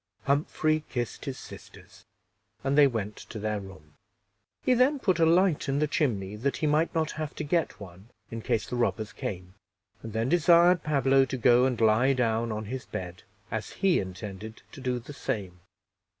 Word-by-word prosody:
Humphrey 155 +2 +1
kissed 120 -2 -4
his 135 -2 -4
sisters, - - -13 0.6
and 135 +1 +1
they 145 -1 +7
went 105 -5 -3
to 115 - -9
their 105 0 -2
room. 90 -6 -13 0.7
He 255 - +3
then 255 +4 +3
put 185 -9 0
a 165 - +5
light 170 -3 +3
in 135 - +1
the 150 - +2
chimney, 105 - -1
that 135 +5 -1
he - - -1
might 155 +3 +1
not 160 -1 0
have 155 -1 -5
to - - -4
get 165 +3 -1
one 95 +2 -12 0.2
in 115 0 -5
case 110 - 0
the 125 - -4
robbers 110 -3 -1
came, 90 0 -6 0.5
and 110 - -7
then 110 +1 0
desired 175 +1 +5
Pablo 135 -2 +3
to 130 - -4
go 125 +1 +5
and 125 -3 -1
lie 115 +4 +4
down 115 -2 0
on 110 0 -4
his 125 +3 -6
bed, 90 -1 -6 0.3
as - - -3
he 190 -3 +2
intended 100 +3 -7
to 145 - -11
do 125 -1 -1
the 125 +4 -9
same. 95 -9 -4
125 Hz, 185 wpm, -28 LUFS, 105-150 Hz, 0.7 s, they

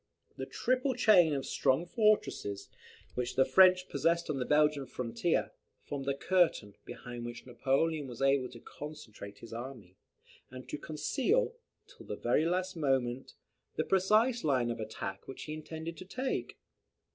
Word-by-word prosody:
The - - -5
triple 255 +1 0
chain 195 -9 +6
of 135 - -3
strong 135 +6 +1
fortresses, 210 - +1 0.4
which 125 0 -3
the 130 - +5
French 185 -1 +6
possessed 170 -1 +1
on 140 - -2
the 125 - -1
Belgian 150 -2 +3
frontier, 120 -2 -1 0.3
formed 140 -1 -5
a 140 - +1
curtain, 170 - +2
behind 120 -1 -8
which 120 0 -7
Napoleon 140 +4 0
was 120 -2 -9
able 135 -2 +2
to 120 - -11
concentrate 110 -11 -9
his 115 +2 -11
army, 115 -6 -8 0.5
and 130 0 -10
to - - -4
conceal, 380 - 0 0.3
till - - -16
the - - -3
very 155 - +1
last 185 +1 -1
moment, 135 -4 -1 0.4
the - - +1
precise 215 +6 +3
line 130 -5 +2
of 115 - -5
attack 105 -3 -6
which 135 - -7
he 155 - -5
intended 160 +1 -6
to 185 - -9
take. 255 +7 -3
145 Hz, 155 wpm, -32 LUFS, 125-180 Hz, 0.5 s, chain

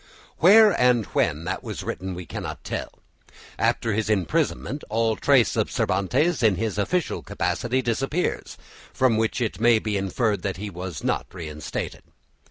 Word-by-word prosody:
Where 210 +4 +8
and 125 -3 +4
when 75 +2 +1
that 90 +3 -3
was - - -6
written, 95 -1 -4
we 90 0 -7
cannot - - -6
tell. - - -4 0.7
After 115 -2 +1
his 110 0 -1
imprisonment 140 - 0
all 110 0 +1
trace - - +3
of - - 0
Cervantes 150 - +1
in 110 -4 +4
his 105 +1 -2
official 175 - -1
capacity 130 +2 -1
disappears, 135 +8 -2 0.3
from 130 -3 +2
which 110 +3 0
it 115 -4 -2
may 120 -1 +5
be 105 -2 -2
inferred 100 +1 0
that 100 -1 -3
he 105 +1 -5
was 90 -3 -6
not - - -1
reinstated. 75 -4 -6
110 Hz, 155 wpm, -24 LUFS, 95-125 Hz, 0.7 s, Where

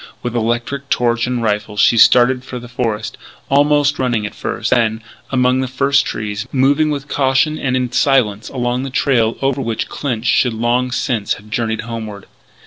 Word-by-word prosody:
With 120 -1 -3
electric 120 +4 -2
torch 120 0 +1
and 125 -2 -2
rifle 105 -1 -2
she 115 - +4
started 125 +3 +5
for 130 - -7
the 120 0 -9
forest, 115 -3 -3 0.3
almost 145 0 +3
running 120 -5 0
at 105 - -6
first; - - -4
then, 110 -2 +1 0.3
among 125 0 +2
the 130 - -1
first 135 +2 +1
trees, 105 -1 -4
moving 140 +3 +2
with 145 -1 -3
caution 140 +3 +1
and 130 -1 0
in 125 -1 -2
silence 110 -7 +1
along 125 -1 -2
the 135 - -4
trail 120 -4 +1
over 135 0 0
which 115 -3 -3
Clinch 120 -5 -4
should 120 0 +2
long 120 +3 0
since 115 -4 -1
have 105 +1 -16
journeyed 110 0 -1
homeward. 110 -4 -7
125 Hz, 175 wpm, -17 LUFS, 110-135 Hz, 0.3 s, started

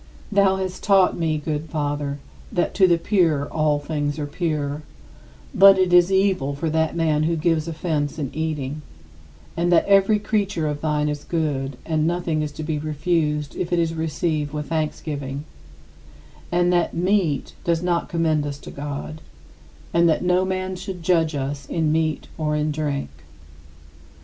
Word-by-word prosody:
46. - - -6
Thou 195 -1 +5
hast 190 -1 -4
taught 195 -2 +4
me, 160 -2 0
good 150 +1 -3
Father, 145 -1 -2 0.3
that 175 - 0
"to 190 -2 +5
the 170 -1 +4
pure 165 -6 +2
all 155 -2 +1
things 145 0 -2
are 150 - -2
pure"; 150 -2 -2 0.7
but 195 0 +8
"it 185 -1 +2
is 175 +1 +6
evil 190 -8 +2
for 160 +2 -2
that 160 0 +1
man 160 -2 +1
who 165 +2 +1
gives 160 0 +1
offense 155 -3 -2
in 140 -4 -3
eating"; 150 -2 -3 0.7
and 175 +1 +1
that 170 - +5
"every 200 +1 +4
creature 200 -5 -1
of 145 -1 -3
thine 150 -1 0
is 150 -1 -3
good, 140 -5 -2
and 155 -1 +1
nothing 170 -2 -1
is 150 -1 -3
to 155 - -6
be 155 -1 -2
refused 150 -1 -1
if 175 - -3
it 175 - +2
is 165 -1 +1
received 155 -2 -2
with 150 -1 -4
thanksgiving"; 150 -3 -3 1.1
and 175 0 +2
that 175 -1 +1
"meat 175 -5 +1
does 170 0 0
not 175 -1 0
commend 160 -3 +1
us 145 -1 -4
to - - -11
God"; 145 +2 -6 0.7
and 170 0 +4
that 160 - +1
"no 180 +1 +3
man 185 0 -2
should 180 -1 -7
judge 165 -3 +2
us 140 +1 -4
in 160 -2 0
meat 155 -1 0
or 150 -1 0
in 150 0 0
drink." 145 - -2
160 Hz, 170 wpm, -23 LUFS, 150-175 Hz, 1.1 s, but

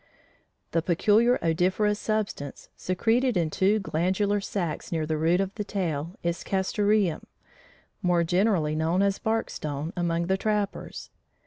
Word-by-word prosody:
The 165 - +1
peculiar 210 +8 +3
odoriferous 185 +6 +1
substance, 210 -10 -3
secreted 230 +5 +1
in 165 -3 0
two 195 +6 +3
glandular 195 +2 0
sacs 175 -6 -3
near 160 -2 0
the 155 0 -1
root 165 +4 +2
of 195 0 -1
the 210 - -4
tail, 175 -4 -3
is 170 +1 -2
"castoreum," 195 -2 +1 0.7
more 175 -3 +2
generally 175 -3 +2
known 165 +5 +1
as 200 -1 +1
"bark 225 -1 -1
stone" 150 +2 -4
among 170 -1 0
the 190 +2 +1
trappers. 210 -1 -3
185 Hz, 135 wpm, -26 LUFS, 165-205 Hz, 0.7 s, peculiar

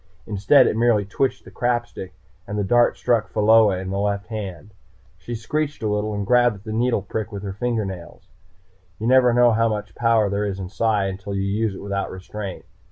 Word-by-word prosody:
Instead 110 +6 +4
it - - +1
merely 115 -3 +2
twitched 130 +7 -2
the - - -12
crap 120 -1 0
stick, 95 -1 -10 0.3
and 105 +1 -4
the 105 - 0
dart 120 +4 +3
struck 120 -3 +1
Pheola 105 -2 +4
in 95 0 -5
the 100 - -2
left 100 0 -1
hand. 100 -3 -7 0.5
She 120 - -6
screeched 145 +5 -3
a - - 0
little 105 0 -1
and 100 -1 -3
grabbed 120 0 +3
at 100 - -15
the 110 -1 -5
needle 115 -2 +1
prick 110 +2 -4
with 100 -1 -6
her 100 -1 -4
fingernails. 100 -6 -4 0.7
You 110 - -5
never 125 0 +5
know 120 0 +5
how 115 +1 +2
much 105 -1 -4
power 115 -3 +2
there 100 +1 -1
is 100 -2 -3
in 95 -2 -6
Psi 105 -1 +1
until 95 +1 -5
you 95 - -1
use 100 +1 -1
it - - -9
without 100 -1 -3
restraint. 95 +1 -7
105 Hz, 210 wpm, -22 LUFS, 100-115 Hz, 0.7 s, never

